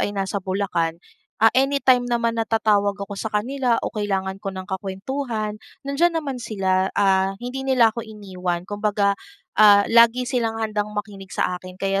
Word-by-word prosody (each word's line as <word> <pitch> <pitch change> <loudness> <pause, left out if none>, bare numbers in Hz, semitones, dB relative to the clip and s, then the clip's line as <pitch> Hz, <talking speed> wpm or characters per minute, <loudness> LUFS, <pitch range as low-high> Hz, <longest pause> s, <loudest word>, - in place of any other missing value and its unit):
ay - - +1
nasa 195 +1 -2
Bulacan. 185 -4 -1 0.4
Ah, 225 0 +4
anytime 260 -2 +3
naman 230 -1 0
na 225 - -2
tatawag 205 -3 +2
ako 200 0 -7
sa 220 - -3
kanila 240 +3 0
o - - -3
kailangan 195 -3 -2
ko 200 - -5
ng 185 - -5
kakwentuhan, 215 +3 -4 0.2
nandiyan 330 +5 +1
naman 275 -6 -3
sila. 190 -4 0
Ah, 195 -1 +2
hindi 250 +4 -5
nila 235 -4 +4
ako 235 - -4
iniwan, 185 -5 -4
kumbaga, 205 0 0 0.5
ah, 205 -1 +8
lagi 235 +2 +5
silang 235 -3 -1
handang 210 -1 -2
makinig 200 -2 -6
sa 180 - 0
akin, 185 0 -11
kaya 195 0 0
210 Hz, 165 wpm, -22 LUFS, 195-235 Hz, 0.5 s, ah